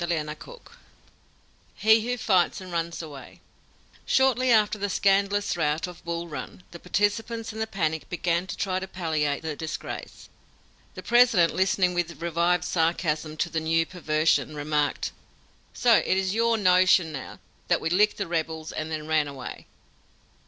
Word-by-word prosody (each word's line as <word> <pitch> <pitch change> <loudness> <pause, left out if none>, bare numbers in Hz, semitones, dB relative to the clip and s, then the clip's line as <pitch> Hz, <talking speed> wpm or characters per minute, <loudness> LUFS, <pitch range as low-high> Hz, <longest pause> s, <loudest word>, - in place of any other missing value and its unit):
"HE 220 +1 +5
WHO 245 +2 -2
FIGHTS 190 -6 +2
AND 185 -1 -10
RUNS 170 0 -3
AWAY 145 -4 -11 0.3
" - - -30
Shortly 255 -1 +3
after 215 -2 +3
the 200 +1 -2
scandalous 200 +1 +1
rout 155 -1 0
of 180 -1 -11
Bull 170 0 -4
Run, 165 +3 -8
the 170 - -10
participants 220 +5 -1
in 220 - -7
the 220 - -1
panic 160 -7 -2
began 175 +1 -1
to - - -6
try 185 -1 -1
to 190 - -6
palliate 160 -6 -2
the 160 -2 -3
disgrace. 155 +1 -7 0.7
The - - -8
President, 235 -8 +4
listening 190 -1 +2
with 170 -1 -3
revived 170 +1 +1
sarcasm 160 -2 -1
to 175 - -1
the 165 - 0
new 165 +1 +1
perversion, 155 -3 0
remarked: 150 0 -1 0.6
"So 235 -3 +4
it 190 - +1
is 190 0 0
your 230 +1 +2
notion 180 -3 +4
now 140 -4 -7 0.3
that - - +2
we 165 - -2
licked 210 +4 +3
the 200 - -2
rebels 160 -2 -3
and 155 0 -4
then 155 -1 -4
ran 155 -1 +1
away!" 135 -3 -8
175 Hz, 155 wpm, -26 LUFS, 160-200 Hz, 0.7 s, HE